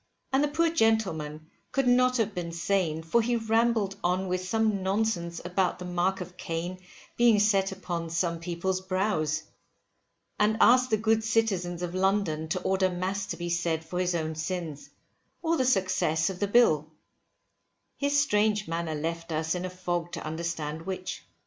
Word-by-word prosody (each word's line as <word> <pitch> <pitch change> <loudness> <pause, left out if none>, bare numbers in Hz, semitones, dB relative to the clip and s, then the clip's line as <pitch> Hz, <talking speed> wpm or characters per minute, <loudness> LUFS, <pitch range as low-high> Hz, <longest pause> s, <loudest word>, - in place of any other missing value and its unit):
And 270 +2 +4
the - - +3
poor 325 +3 +1
gentleman 185 - +1 0.3
could 270 -2 +1
not 250 +1 +4
have 220 -2 0
been 175 -2 -4
sane 165 -2 0
for 170 +9 +2
he 240 +2 0
rambled 225 -3 +1
on 185 +2 +1
with 185 0 -1
some 215 +1 +1
nonsense 190 -3 -1
about 180 +1 0
the 180 - -7
mark 180 +2 0
of 180 0 -8
Cain 170 +3 -4 0.4
being 235 -2 +5
set 195 -2 +3
upon 175 -3 -4
some 170 0 -1
people's 175 +2 -2
brows; 185 -5 0 1.0
and 215 +1 +3
asked 250 +1 +6
the 220 - +3
good 220 +1 +2
citizens 195 -6 0
of 175 0 -3
London 185 -5 +1
to 185 +3 -1
order 190 0 +2
mass 185 +2 -2
to - - -4
be 175 0 -3
said 170 -2 0
for 180 +2 -4
his 180 -1 +1
own 160 -1 -1
sins, 160 -2 -4 0.5
or 330 0 +2
the 260 - +1
success 185 -7 +2
of 180 - -9
the 205 - +1
Bill; 160 -9 +4 1.1
his 285 0 +1
strange 210 -6 +2
manner 165 -1 -2
left 165 +2 -4
us 160 0 0
in 180 0 -3
a - - -3
fog 175 -1 -3
to - - -5
understand 160 -1 -3
which. 185 -1 -4
185 Hz, 170 wpm, -28 LUFS, 170-215 Hz, 1.1 s, asked